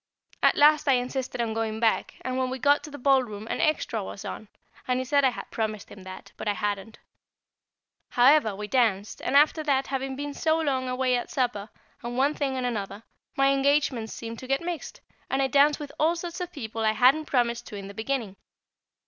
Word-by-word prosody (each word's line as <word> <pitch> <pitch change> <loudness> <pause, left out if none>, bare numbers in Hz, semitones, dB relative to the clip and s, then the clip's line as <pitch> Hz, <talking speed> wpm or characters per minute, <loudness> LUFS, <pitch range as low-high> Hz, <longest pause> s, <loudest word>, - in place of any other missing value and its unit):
At - - +4
last 300 +1 +5
I 275 - +6
insisted 250 0 -2
on 225 -2 -1
going 220 -1 -2
back, 225 -1 +1
and 255 0 -3
when 260 0 0
we 260 - -3
got 285 +3 +3
to - - -9
the 290 - -9
ballroom 250 -6 +1
an - - -2
extra 295 -8 0
was 195 - -8
on, 215 - -6 0.4
and 250 0 +1
he - - -1
said 280 +2 +2
I 265 - +5
had 245 - -8
promised 215 -2 -3
him 195 - -11
that, 185 0 -10
but - - -6
I 205 - +2
hadn't. 205 +1 -3 1.1
However, 250 -4 +4
we 210 +1 -6
danced, 215 -5 0
and 280 - +2
after 305 +2 +4
that, 275 -3 +1
having 270 0 -3
been 290 +1 -5
so 315 +2 +1
long 265 -5 -1
away 255 0 +1
at 240 - -3
supper, 235 -5 -1 0.3
and 240 +1 -5
one 280 +3 +3
thing 275 -3 -2
and 255 - -2
another, 205 -3 -4 0.3
my 275 0 +4
engagements 275 -5 +1
seemed 230 0 -7
to 255 - -9
get 270 +1 +1
mixed, 340 -1 -6 0.3
and 270 - 0
I 270 - +3
danced 285 +3 +4
with 290 -2 -7
all 320 +3 +3
sorts 345 +1 -6
of 360 -1 -4
people 225 -6 -5
I 215 0 +3
hadn't 260 +8 +4
promised 240 -3 0
to - - -8
in 200 -1 -7
the 200 - -9
beginning. 220 -2 -3
255 Hz, 215 wpm, -26 LUFS, 220-280 Hz, 1.1 s, I